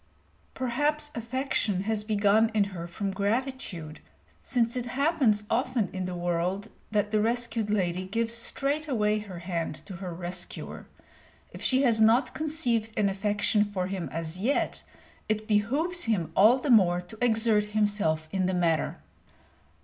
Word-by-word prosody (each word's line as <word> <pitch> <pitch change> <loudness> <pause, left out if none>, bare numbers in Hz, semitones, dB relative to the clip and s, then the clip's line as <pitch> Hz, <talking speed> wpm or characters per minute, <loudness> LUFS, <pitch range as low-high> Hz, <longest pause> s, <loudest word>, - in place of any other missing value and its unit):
Perhaps 295 +4 0
affection 230 -4 -1
has 215 0 -1
begun 215 +1 +3
in 210 - +4
her 170 -1 -5
from 195 +3 -3
gratitude, 200 - -2 0.4
since 235 -2 0
it 245 -1 -3
happens 255 -5 +2
often 245 -3 0
in 185 -1 -3
the 180 0 -4
world 175 +4 -1 0.2
that 210 -1 0
the 215 -1 +2
rescued 230 -1 0
lady 185 -3 0
gives 230 +4 -1
straightway 245 -3 0
her 200 -4 -8
hand 170 -3 -3
to 190 -4 -8
her 185 -1 -6
rescuer. 180 +1 -5 0.6
If - - -10
she 260 +1 +3
has 230 -4 +3
not 225 +5 +4
conceived 245 -9 -1
an 205 -2 +3
affection 205 +1 +1
for 200 -3 -3
him 185 -2 -4
as 165 +1 -4
yet, 250 +8 0 0.5
it 215 0 -1
behooves 275 - +1
him 185 -8 0
all 220 +6 +6
the 265 +1 -1
more 180 -6 +5
to 215 +6 -8
exert 220 -2 +3
himself 205 -7 0
in 190 -1 0
the 185 - 0
matter. 165 -3 +1
210 Hz, 150 wpm, -28 LUFS, 185-240 Hz, 0.6 s, all